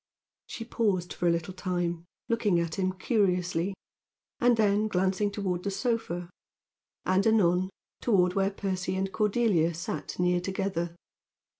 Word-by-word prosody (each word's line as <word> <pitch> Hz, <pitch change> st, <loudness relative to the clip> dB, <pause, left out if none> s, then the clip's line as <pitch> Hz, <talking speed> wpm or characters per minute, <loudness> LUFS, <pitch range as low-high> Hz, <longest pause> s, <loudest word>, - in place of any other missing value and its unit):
She 230 Hz, -, -6 dB
paused 200 Hz, -7 st, 0 dB
for 175 Hz, -, -1 dB
a -, -, +5 dB
little 170 Hz, +2 st, -2 dB
time, 175 Hz, -2 st, -2 dB, 0.2 s
looking 215 Hz, -6 st, +2 dB
at 170 Hz, +1 st, -2 dB
him 185 Hz, -1 st, +1 dB
curiously, 185 Hz, -3 st, +1 dB, 0.6 s
and 240 Hz, -1 st, +4 dB
then 210 Hz, 0 st, +3 dB
glancing 190 Hz, +1 st, +1 dB
toward 190 Hz, -3 st, -2 dB
the 200 Hz, -, -1 dB
sofa, 190 Hz, -6 st, -2 dB, 0.7 s
and, 190 Hz, +3 st, +3 dB
anon, 185 Hz, -4 st, +3 dB, 0.3 s
toward 180 Hz, -6 st, +3 dB
where 195 Hz, 0 st, +2 dB
Percy 190 Hz, -2 st, -2 dB
and 190 Hz, 0 st, -1 dB
Cordelia 205 Hz, -7 st, +2 dB
sat 170 Hz, -, -5 dB
near 180 Hz, 0 st, +2 dB
together. 180 Hz, -2 st, -2 dB
185 Hz, 135 wpm, -28 LUFS, 175-205 Hz, 0.7 s, a